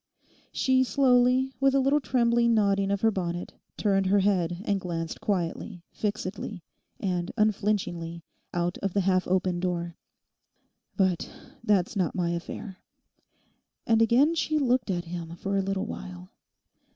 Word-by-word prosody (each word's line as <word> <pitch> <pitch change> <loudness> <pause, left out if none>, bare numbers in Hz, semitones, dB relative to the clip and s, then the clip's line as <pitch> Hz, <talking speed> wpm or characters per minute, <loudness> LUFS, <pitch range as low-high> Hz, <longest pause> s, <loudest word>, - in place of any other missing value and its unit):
She 260 -1 +2
slowly, 255 0 +3
with 270 0 +3
a - - +5
little 275 +3 +3
trembling 235 -3 +2
nodding 200 -2 +2
of 200 -1 0
her 225 - +4
bonnet, 175 -3 -4 0.2
turned 195 -2 +2
her 200 +1 +4
head 180 -3 +1
and 200 -2 0
glanced 165 -2 -4
quietly, 175 -2 -2
fixedly, 205 -3 -4 0.4
and 180 -2 -1
unflinchingly, 195 -6 0 0.3
out 175 +1 -1
of 195 -2 -2
the 200 - +2
half 185 -1 +1
open 185 -1 +1
door. 175 -2 -3 1.0
'But 185 -4 +1 0.3
that's 210 0 +2
not 185 -4 0
my 175 -2 0
affair.' 180 +3 -6 1.1
And 225 -1 +3
again 250 +8 +4
she 310 -1 0
looked 255 -5 +1
at 175 -2 -1
him 170 -1 -6
for 195 +3 -3
a 195 - +2
little 195 +1 -2
while. 185 -4 -8
195 Hz, 140 wpm, -27 LUFS, 175-230 Hz, 1.1 s, a